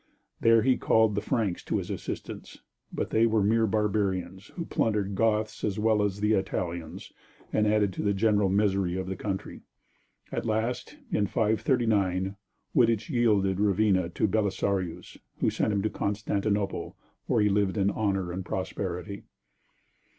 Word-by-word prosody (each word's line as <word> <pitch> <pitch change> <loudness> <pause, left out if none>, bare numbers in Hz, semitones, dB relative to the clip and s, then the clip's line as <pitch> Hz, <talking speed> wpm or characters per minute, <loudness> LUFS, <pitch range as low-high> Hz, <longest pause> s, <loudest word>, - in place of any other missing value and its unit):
There 115 -1 +5
he 130 -1 +3
called 110 -1 +3
the 100 - -1
Franks 110 -9 -1
to - - 0
his - - -4
assistance, - - -7 0.3
but - - -3
they 115 +1 +4
were 110 -2 +2
mere 110 +2 +3
barbarians, 100 -3 -1
who 170 - -4
plundered 105 -7 0
Goths 110 +1 0
as 105 -1 -1
well 110 0 +2
as 100 0 -1
Italians 90 -5 -2 0.4
and 105 0 +3
added 105 -2 +2
to - - -4
the 100 -1 +1
general 105 -1 +2
misery 95 -2 +1
of 95 - -3
the 95 +1 -4
country. 95 0 -5 0.7
At - - -2
last, 115 - -2
in 105 - +1
539, 105 -3 +1 0.4
Wittich 115 - +3
yielded 105 -6 +2
Ravenna 100 -3 +2
to 90 - 0
Belisarius 100 -3 -1 0.2
who - - +1
sent - - 0
him 100 -1 0
to 110 - +1
Constantinople, 100 -1 -2 0.3
where - - +2
he 105 - +3
lived 100 0 +1
in 100 0 +2
honor 95 -4 -1
and 95 +2 -4
prosperity. 95 +1 -4
105 Hz, 150 wpm, -28 LUFS, 95-110 Hz, 0.7 s, There